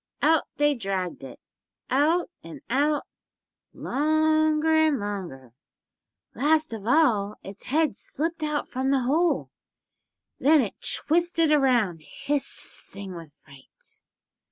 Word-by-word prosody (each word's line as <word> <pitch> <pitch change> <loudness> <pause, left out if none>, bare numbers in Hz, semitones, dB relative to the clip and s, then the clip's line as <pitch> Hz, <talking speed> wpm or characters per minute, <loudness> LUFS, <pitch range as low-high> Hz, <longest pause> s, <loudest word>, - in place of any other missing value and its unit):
Out 315 0 +4
they 295 0 +3
dragged 190 - -4
it, 130 -2 -10 0.5
out 320 +7 +2
and 165 -1 -10
out, 290 +3 +2 0.7
longer 310 +1 +1
and 290 -5 0
longer. 180 - -6 0.8
Last 310 -1 +1
of 215 -1 -7
all 225 -8 +3
its 195 +1 -9
head 300 -3 +1
slipped 325 +8 -4
out 300 -1 -2
from 260 +1 -2
the 270 -1 +2
hole. 315 +8 +1 0.9
Then 300 +2 +5
it 210 - -4
twisted 330 0 +1
around, 245 - +2
hissing 200 - -5
with 165 -3 -10
fright. 140 -2 -15
275 Hz, 110 wpm, -25 LUFS, 200-310 Hz, 0.9 s, Then